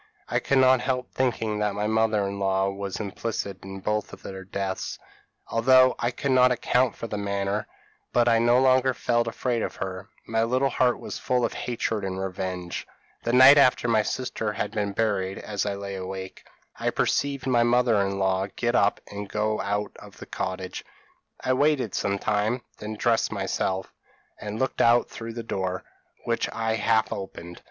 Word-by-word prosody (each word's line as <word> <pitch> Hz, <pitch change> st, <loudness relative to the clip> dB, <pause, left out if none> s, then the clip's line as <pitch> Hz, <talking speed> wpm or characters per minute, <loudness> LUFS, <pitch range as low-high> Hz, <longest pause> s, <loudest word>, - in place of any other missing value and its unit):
I -, -, +1 dB
could 140 Hz, -, +1 dB
not 130 Hz, -1 st, +5 dB
help 125 Hz, 0 st, -2 dB
thinking 115 Hz, -4 st, -1 dB
that 105 Hz, -1 st, 0 dB
my 105 Hz, +1 st, -1 dB
mother 110 Hz, -2 st, +2 dB
in 100 Hz, 0 st, -5 dB
law 95 Hz, 0 st, +1 dB
was 100 Hz, -1 st, -5 dB
implicated 100 Hz, -1 st, -4 dB
in 95 Hz, 0 st, -8 dB
both 105 Hz, +1 st, -1 dB
their 95 Hz, 0 st, -9 dB
deaths, 95 Hz, 0 st, -4 dB, 0.5 s
although 130 Hz, +2 st, +5 dB
I 120 Hz, -, +1 dB
could 130 Hz, +3 st, -2 dB
not 125 Hz, -1 st, +5 dB
account 125 Hz, 0 st, +1 dB
for -, -, -6 dB
the 105 Hz, -2 st, -4 dB
manner; 100 Hz, +1 st, -2 dB, 0.4 s
but 120 Hz, -1 st, +3 dB
I 115 Hz, -1 st, +5 dB
no 120 Hz, +2 st, +4 dB
longer 130 Hz, 0 st, +4 dB
felt 120 Hz, 0 st, +1 dB
afraid 120 Hz, 0 st, -1 dB
of -, -, -3 dB
her; 95 Hz, +2 st, -6 dB, 0.2 s
my 115 Hz, 0 st, 0 dB
little 130 Hz, +3 st, +1 dB
heart 125 Hz, -1 st, +2 dB
was -, -, -6 dB
full 125 Hz, -1 st, +1 dB
of -, -, -3 dB
hatred 115 Hz, -3 st, -2 dB
and 95 Hz, -1 st, -3 dB
revenge. 90 Hz, -2 st, -4 dB, 0.3 s
"The 120 Hz, -, -1 dB
night 130 Hz, +3 st, +9 dB
after 125 Hz, -2 st, +4 dB
my 110 Hz, -2 st, +4 dB
sister 110 Hz, -2 st, -3 dB
had -, -, -3 dB
been 105 Hz, -2 st, -1 dB
buried, 95 Hz, -3 st, 0 dB
as 105 Hz, -1 st, -3 dB
I 100 Hz, -, -1 dB
lay 100 Hz, 0 st, -6 dB
awake, 95 Hz, 0 st, -7 dB, 0.3 s
I -, -, +1 dB
perceived 140 Hz, -2 st, 0 dB
my 125 Hz, -3 st, +3 dB
mother 120 Hz, -2 st, +3 dB
in 100 Hz, 0 st, -1 dB
law 95 Hz, 0 st, +1 dB
get 120 Hz, 0 st, 0 dB
up 100 Hz, -3 st, +2 dB
and 100 Hz, 0 st, -7 dB
go 110 Hz, +1 st, 0 dB
out 105 Hz, +1 st, -2 dB
of -, -, -14 dB
the -, -, -9 dB
cottage. 95 Hz, 0 st, -4 dB, 0.6 s
I 130 Hz, -, +1 dB
waited 135 Hz, -4 st, +2 dB
some 100 Hz, 0 st, 0 dB
time, 110 Hz, +4 st, 0 dB, 0.2 s
then 105 Hz, +1 st, -5 dB
dressed 115 Hz, +1 st, +1 dB
myself, 95 Hz, -2 st, -2 dB, 0.5 s
and 105 Hz, +1 st, -5 dB
looked 130 Hz, +3 st, 0 dB
out 120 Hz, +1 st, +4 dB
through 115 Hz, 0 st, -7 dB
the 115 Hz, 0 st, -5 dB
door, 95 Hz, -4 st, -3 dB, 0.4 s
which -, -, -1 dB
I 115 Hz, 0 st, -1 dB
half 110 Hz, 0 st, +2 dB
opened. 90 Hz, -3 st, -8 dB
110 Hz, 180 wpm, -26 LUFS, 100-120 Hz, 0.6 s, night